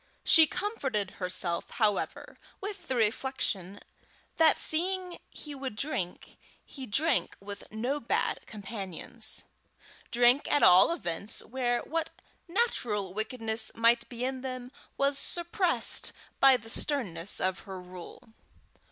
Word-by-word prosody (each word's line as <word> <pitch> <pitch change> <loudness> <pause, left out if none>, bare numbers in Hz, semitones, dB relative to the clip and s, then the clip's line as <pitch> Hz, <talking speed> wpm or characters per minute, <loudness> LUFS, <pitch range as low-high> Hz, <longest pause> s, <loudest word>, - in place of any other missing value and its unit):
She 320 -1 +8
comforted 275 - -2
herself, 180 -1 -1
however, 215 -3 -1 0.2
with 400 0 -7
the 260 - -1
reflection, 210 -4 -1 0.6
that 320 -1 +6
seeing 360 +2 0
he 295 - -8
would 265 -5 -5
drink, 210 - -4 0.3
he 265 -3 -9
drank 310 +11 +1
with 200 0 -9
no 245 +7 -2
bad 235 - -1
companions 215 +2 -5 0.7
drank 245 +3 +3
at 290 - +3
all 185 - +7
events 200 - -2
where 245 -1 -1
what 325 +1 -2 0.4
natural 235 - -1
wickedness 220 +1 -1
might 230 +1 +3
be 245 0 -4
in 260 0 -3
them, 255 -1 -6 0.3
was 275 0 +2
suppressed 345 +1 +2 0.3
by 270 -1 +7
the 225 -1 -8
sternness 200 - -1
of 190 0 0
her 190 -1 -8
rule. 180 +6 -12
245 Hz, 120 wpm, -29 LUFS, 205-290 Hz, 0.7 s, She